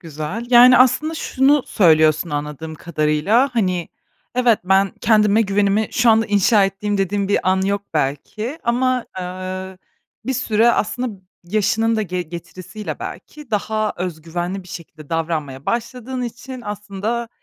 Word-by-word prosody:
güzel. 165 +8 -6
Yani, 250 +1 +8
aslında 305 +5 +3
şunu 280 -2 +2
söylüyorsun 160 -3 +3
anladığım 150 +2 -5
kadarıyla, 170 - +1
hani, 185 -7 0 0.5
evet, 245 -3 +3
ben, 195 +1 +3
kendime 215 -1 +4
güvenimi 200 +1 +1
şu 240 -1 +3
anda 225 0 +3
inşa 205 0 +4
ettiğim 200 +1 -2
dediğim 195 +1 0
bir 195 -2 +1
an 190 0 +2
yok 200 +1 -1
belki, 160 - -2
ama, 250 +1 +1 0.2
ııı, 185 +1 -6 0.5
bir 265 - -1
süre 225 0 +3
aslında 220 -2 -2 0.2
yaşının 215 +4 +1
da 215 - 0
ge 180 -1 -3
getirisiyle 175 +5 -8
belki 300 -4 -9
daha 215 0 -1
öz 175 -3 -5
güvenli 175 +4 -4
bir 180 - -16
şekilde 160 -4 -10
davranmaya 155 -5 -3
başladığın 250 +2 -3
için 250 +2 -7
aslında 210 +3 -4
200 Hz, 140 wpm, -20 LUFS, 175-235 Hz, 0.5 s, Yani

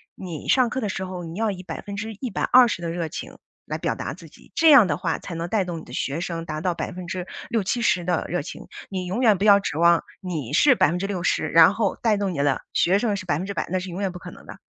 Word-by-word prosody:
你 170 -5 -7
上 255 -3 +4
课 255 - -3
的 215 -5 -2
时 190 - -3
候 185 -1 -6
你 165 +1 -7
要 225 -1 +1
以 185 -1 -8
120% 215 +3 +1
的 170 - -3
热 170 -1 -3
情 - - -8 0.3
来 - - -4
表 - - -1
达 - - -5
自 - - -13
己， - - -20
这 325 - +5
样 265 -9 +8
的 145 - 0
话 165 0 -2
才 175 - -7
能 165 +1 -4
带 205 -2 +1
动 175 -2 -5
你 - - -13
的 - - -14
学 145 +5 -2
生 170 -2 -4
达 155 -1 -4
到 180 +1 0
60-70% 185 +3 -2
的 175 -2 0
热 175 - -1
情， 150 - -9 0.2
你 185 -2 -4
永 190 +6 -2
远 220 -6 +4
不 195 - -3
要 200 -1 +7
指 195 - -4
望 170 0 +5 0.2
你 155 -9 -4
是 275 - +6
60%， 180 -3 0
然 165 +4 +7
后 205 -2 -1
带 225 -3 +3
动 200 -2 -1
你 - - -6
的 140 -1 +1
学 185 +3 +3
生 210 -1 0
是 190 - -7
100%， 180 +5 -2
那 185 - +1
是 185 +1 -7
永 175 +2 -6
远 195 - 0
不 - - -7
可 - - -9
能 - - -15
的。 - - -10
185 Hz, 245 characters per minute, -24 LUFS, 170-205 Hz, 0.3 s, 样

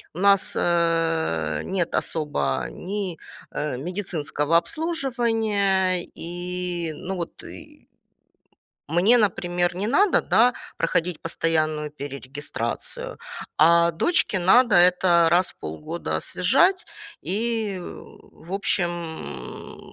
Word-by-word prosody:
у - - -6
нас, 200 0 +4
э, 165 - +1
нет 180 -3 -1
особо 70 - -1
ни, 190 - -5 0.4
э, 150 -4 -2
медицинского 165 -2 -1
обслуживания, 220 - 0
и, 175 -1 -4
ну 190 +5 -5
вот, 170 -2 -6
и - - -13 1.0
Мне, 190 +10 +4
например, 175 -3 +1
не 200 - -2
надо, 375 - +3
да, 245 +3 +3 0.2
проходить 165 0 -1
постоянную 155 -2 -1
перерегистрацию, 145 - -6 0.4
а 170 +2 +5
дочке 210 - +2
надо 235 +5 +5
это 175 -1 +5
раз 175 +1 +3
в - - -44
полгода 155 - -4
освежать 375 0 +2 0.3
и, 215 0 -2
в 175 0 -12
общем, 175 - -3
175 Hz, 95 wpm, -24 LUFS, 160-200 Hz, 1.0 s, а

